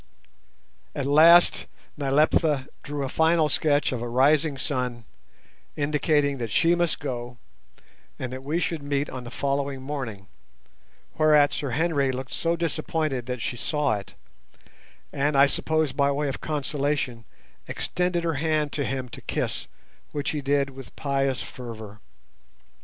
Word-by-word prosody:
At 140 - -2
last 165 +5 +6 0.3
Nyleptha 145 0 +2
drew 145 -1 -4
a - - -1
final 160 +2 +3
sketch 145 0 +2
of 125 -3 -3
a 120 - -3
rising 140 +4 +3
sun, 125 -4 -2 0.7
indicating 145 -1 +1
that 115 -2 -3
she 165 +11 +3
must 175 -2 0
go, 125 -4 -5 0.8
and 130 -1 -5
that 130 - -6
we 155 +5 -1
should 165 -3 -2
meet 140 0 -1
on 130 -1 -7
the - - -6
following 140 +1 -2
morning; 130 -9 -5 0.9
whereat 150 -2 +5
Sir 140 - -2
Henry 145 0 +1
looked 130 0 -6
so 165 0 0
disappointed 155 -5 -1
that 125 -2 -3
she - - -2
saw 145 +2 0
it, 100 - -13 1.0
and, 140 +1 +1
I 140 - +8
suppose 155 +1 +1
by 140 +1 +2
way 145 +1 -1
of 135 - -5
consolation, 145 -5 -1 0.4
extended 180 -1 -1
her 165 -1 0
hand 155 -2 +1
to 145 - -2
him 130 -2 -3
to - - -10
kiss, - - -3 0.5
which 145 -1 -1
he 150 - -3
did 140 0 +1
with 135 -1 -11
pious 135 -2 0
fervour. 110 -4 -9
140 Hz, 145 wpm, -25 LUFS, 130-155 Hz, 1.0 s, I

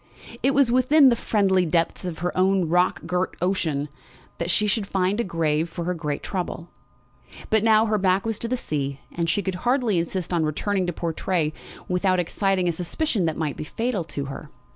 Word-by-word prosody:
It 270 +3 +2
was 275 -4 +4
within 260 +3 +6
the 240 - +3
"friendly 195 -5 +2
depths 165 +2 0
of 175 -3 -4
her 180 - -1
own 185 -1 +2
rock 180 +1 +1
girt 180 +2 -1
ocean" 165 -6 0 0.5
that 170 - -2
she 210 +4 +3
should 210 -1 0
find 195 +2 0
a - - +2
grave 165 -3 0
for 170 - -5
her 180 +2 -1
great 150 -4 -4
trouble. 175 -3 -4 0.8
But 220 -1 +3
now 220 0 +5
her 215 -1 +1
back 190 +1 +2
was 225 -2 -2
to 235 - -3
the 255 +2 -1
sea, 140 - -3
and 170 -1 -2
she 200 +4 +1
could 190 - -2
hardly 245 -7 +2
insist 175 +1 -3
on 170 -2 +2
returning 185 +5 -1
to - - 0
Portray 165 -1 -1 0.3
without 185 0 +1
exciting 185 +1 0
a - - +3
suspicion 180 - -1
that 160 -2 -1
might 155 -3 -2
be - - -4
fatal 225 +4 -2
to 140 -3 -4
her. 135 - -8
185 Hz, 200 wpm, -24 LUFS, 165-210 Hz, 0.8 s, within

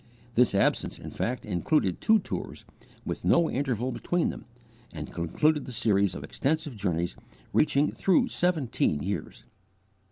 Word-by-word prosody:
This 120 -4 +3
absence 100 - +1
in - - -9
fact 125 +2 -3
included 95 - 0
two 220 - +5
tours, - - -5 0.4
with - - -4
no 170 -1 +3
interval 130 -2 -1
between 175 +6 0
them, - - -7 0.5
and 75 -2 -7
concluded 145 - +1
the - - -6
series 100 -5 +2
of 70 - -6
extensive 150 - -1
journeys 85 -4 -1 0.4
reaching 150 -1 +3
through 190 -3 +2
seventeen 140 - 0
years. 100 +2 -4
125 Hz, 135 wpm, -28 LUFS, 95-155 Hz, 0.5 s, two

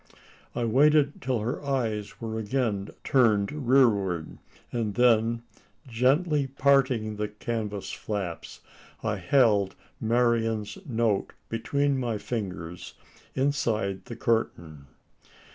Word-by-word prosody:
I 120 - 0
waited 145 +4 +3
till 125 -3 -1
her 120 +6 -3
eyes 115 -7 -2
were 110 -1 -4
again 110 -3 -1
turned 110 -6 +3 0.2
rearward; 100 - +2 0.3
and 110 -4 -2
then, 115 -1 +3 0.4
gently 140 +5 +2
parting 130 -5 +2
the 105 0 -1
canvas 105 -1 -4
flaps, 95 -6 -5 0.4
I 105 -2 0
held 100 -1 +3 0.2
Marian's 115 - +1
note 115 -5 0 0.2
between 140 +4 0
my 120 -4 -1
fingers 90 -7 -5 0.4
inside 115 -8 0
the 120 - -7
curtain. 80 -12 -2
115 Hz, 100 wpm, -27 LUFS, 105-130 Hz, 0.4 s, waited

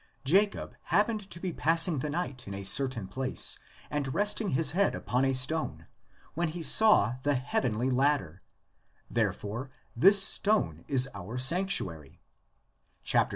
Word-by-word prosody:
Jacob 200 +8 0
happened 205 +3 -1
to 170 - -8
be 180 -1 -5
pass 165 +3 +3
ing 160 -6 -2
the 150 - -4
night 140 -7 -5
in 100 - -7
a 100 - -7
certain 120 0 +1
place 130 +7 -3 0.3
and 140 -3 -4
resting 205 0 0
his 160 +1 0
head 195 +4 0
upon 125 +2 -2
a 135 - +1
stone 130 - 0 0.5
when 170 +2 -2
he 165 +2 -7
saw 155 - +6
the 145 +1 0
heavenly 125 -2 -2
ladder; 130 - -1 0.7
therefore 115 +6 -3 0.3
this 195 - +5
stone 195 - +1
is 135 -1 +1
our 100 +5 -8
sanctuary 125 - 0 0.9
(xxviii. - - +2
140 Hz, 145 wpm, -28 LUFS, 125-175 Hz, 0.9 s, saw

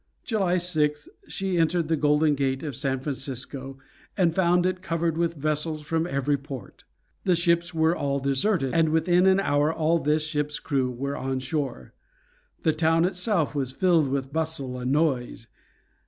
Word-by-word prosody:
July 195 -6 0
6th 150 -4 0 0.2
she 190 -2 -2
entered 165 0 +1
the 160 - +2
Golden 150 0 +3
Gate 135 -1 -1
of 145 -5 -4
San 135 0 -1
Francisco, 135 0 -5 0.4
and 175 -4 +3
found 180 0 +3
it 185 0 -1
crowded 165 -2 -1
with 170 0 0
vessels 155 +1 -2
from 165 +2 -1
every 140 -1 0
port. 135 -7 -10 0.4
The 180 -2 +3
ships 170 0 +1
were 160 0 +2
all 140 -3 -1
deserted, 140 +2 +1
and 165 -1 +3
within 175 +3 +3
an 190 0 +5
hour 145 -4 +2
all 165 +1 +1
this 150 +1 +1
ship's 150 -1 -2
crew 135 -4 -1
were 140 +3 -4
on 130 0 -2
shore. 130 - -4 0.7
The 160 - +3
town 165 +1 +2
itself 180 -4 0
was 135 -3 -2
filled 170 -1 +2
with 135 0 -3
bustle 155 -6 -2
and 125 +1 -2
noise. 135 -6 0
155 Hz, 165 wpm, -25 LUFS, 140-170 Hz, 0.7 s, an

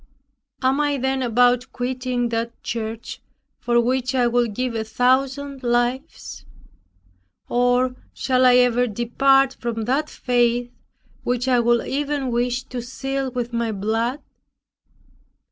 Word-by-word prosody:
Am 265 +2 +2
I 290 -1 +1
then 265 0 -1
about 245 +1 +2
quitting 250 -1 -2
that 230 0 -4
church, 225 0 -5 0.4
for 240 0 +2
which 255 +2 0
I 250 -1 +3
would 240 -3 +1
give 250 0 -2
a 225 -1 -2
thousand 265 +4 0
lives? 240 +1 -2 1.0
Or, 245 +1 +2 0.2
shall 255 -1 +1
I 250 - +6
ever 245 0 +4
depart 270 +5 +2
from 230 -2 -3
that 275 +7 0
faith 240 -1 0 0.5
which 245 +1 -1
I 250 -2 +4
would 235 0 +2
even 285 -2 -2
wish 245 +1 0
to 250 -2 -6
seal 270 +2 -3
with 245 -1 -4
my 235 -1 -1
blood?" 225 +6 -1
245 Hz, 130 wpm, -22 LUFS, 235-260 Hz, 1.0 s, I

